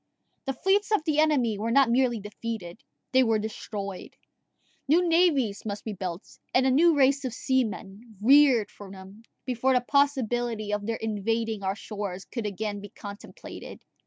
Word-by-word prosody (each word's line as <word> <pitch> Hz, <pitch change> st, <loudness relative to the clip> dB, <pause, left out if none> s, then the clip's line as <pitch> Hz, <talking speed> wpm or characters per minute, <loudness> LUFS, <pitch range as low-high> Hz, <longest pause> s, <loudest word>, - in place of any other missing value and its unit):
The 270 Hz, -, -1 dB
fleets 385 Hz, +9 st, +1 dB
of 425 Hz, -7 st, +2 dB
the 305 Hz, -1 st, +1 dB
enemy 260 Hz, -9 st, +2 dB
were 225 Hz, +2 st, -2 dB
not 260 Hz, 0 st, +4 dB
merely 245 Hz, -2 st, +2 dB
defeated 210 Hz, -1 st, -7 dB, 0.3 s
they 260 Hz, -, +5 dB
were 225 Hz, -3 st, +3 dB
destroyed: 210 Hz, -2 st, -6 dB, 0.7 s
new 345 Hz, +5 st, +4 dB
navies 305 Hz, -, +2 dB
must 205 Hz, -1 st, -5 dB
be 220 Hz, -, -4 dB
built, 180 Hz, -1 st, -7 dB, 0.2 s
and 255 Hz, +1 st, +4 dB
a 265 Hz, -, +3 dB
new 320 Hz, +3 st, +4 dB
race 280 Hz, +1 st, +3 dB
of 250 Hz, -3 st, -4 dB
seamen 225 Hz, -4 st, -2 dB
reared 260 Hz, -1 st, +5 dB
for 200 Hz, -1 st, -12 dB
them, 190 Hz, +2 st, -12 dB, 0.2 s
before 255 Hz, +1 st, +1 dB
the 250 Hz, -, +3 dB
possibility 240 Hz, -6 st, 0 dB
of 205 Hz, 0 st, -2 dB
their 230 Hz, -, -1 dB
invading 225 Hz, 0 st, -2 dB
our 190 Hz, 0 st, -1 dB
shores 200 Hz, -3 st, -6 dB
could 235 Hz, -4 st, -4 dB
again 205 Hz, +1 st, -4 dB
be 205 Hz, -, -9 dB
contemplated. 205 Hz, +1 st, -10 dB
230 Hz, 160 wpm, -27 LUFS, 205-265 Hz, 0.7 s, they